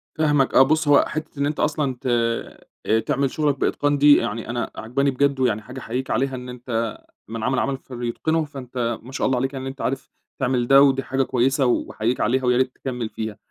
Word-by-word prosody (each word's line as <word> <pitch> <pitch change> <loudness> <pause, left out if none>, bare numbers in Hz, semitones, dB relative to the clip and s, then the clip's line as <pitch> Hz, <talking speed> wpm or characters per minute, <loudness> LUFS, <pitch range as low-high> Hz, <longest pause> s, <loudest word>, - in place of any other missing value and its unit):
فاهمك 150 -4 +2
آه، - - +8
بُصّ، 155 +3 +1
هو 145 -1 +6
حتّة 155 -1 -6
إن 140 - +2
أنت 150 +1 -2
أصلًا 150 -3 0
ت - - -4 0.8
آآ، 110 +1 +3
تعمل 135 +3 0
شغلك 145 -3 0
بإتقان 145 0 +1
دي 145 +1 +7
يعني 115 0 -3
أنا 120 0 -3
عاجباني 135 +5 0
بجد، 140 +1 +1
ويعني 120 -5 +1
حاجة 125 +4 -9
أحيّيك 125 +2 -4
عليها 130 +3 0
إن 125 0 -7
أنت 115 -2 -3 0.3
من 115 0 -5
عمل 130 +1 +1
عملًا 135 -1 -1
فليتقنه، 130 +6 -2
فأنت 125 -4 -4
ما 130 - -11
شاء - - -1
الله 130 -1 +1
عليك 135 +2 -1
يعني 135 -1 -5
إن 135 - -3
أنت 135 - -9
عارف 135 +1 -3 0.3
تعمل 125 -2 0
ده 135 +1 +7
ودي 135 -1 +4
حاجة 135 0 0
كويسة 135 +3 +1
وأحيّيك 120 -1 0
عليها 130 +3 +1
ويا 125 0 +3
ريت 130 -1 +1
تكمّل 125 -4 -4
فيها، 110 -1 -5
130 Hz, 215 wpm, -22 LUFS, 120-140 Hz, 0.8 s, آه